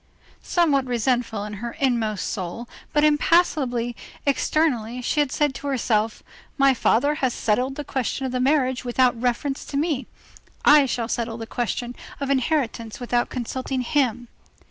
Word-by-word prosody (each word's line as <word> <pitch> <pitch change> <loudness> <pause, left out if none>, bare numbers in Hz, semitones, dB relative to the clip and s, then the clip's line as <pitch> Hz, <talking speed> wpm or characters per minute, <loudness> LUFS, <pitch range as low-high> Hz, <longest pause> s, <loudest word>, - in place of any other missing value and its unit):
Somewhat 295 -7 +2
resentful 240 -3 0
in 210 0 -6
her 235 -1 -4
inmost 230 -6 0
soul, 200 +4 -4 0.2
but 295 - +2
impassible 295 -6 +2 0.3
externally, 260 -5 +1
she 300 - 0
had 290 -3 +2
said 295 -2 +1
to 285 - -6
herself: 225 -5 0 0.3
"My 275 -1 +5
father 260 +4 +2
has 255 -3 +1
settled 250 +5 0
the 295 - -4
question 265 0 -2
of 260 - -2
the 255 - -1
marriage 260 -1 +2
without 245 -1 +2
reference 255 +3 -1
to 280 - -4
me; 295 -3 -1 0.6
I 290 -2 +7
shall 235 -2 -2
settle 230 -1 -2
the 225 - -6
question 240 +1 -3 0.2
of 280 -1 -3
the - - +2
inheritance 255 -5 -1
without 245 -1 0
consulting 255 +1 -3
him." 245 -2 0
255 Hz, 155 wpm, -23 LUFS, 235-280 Hz, 0.6 s, I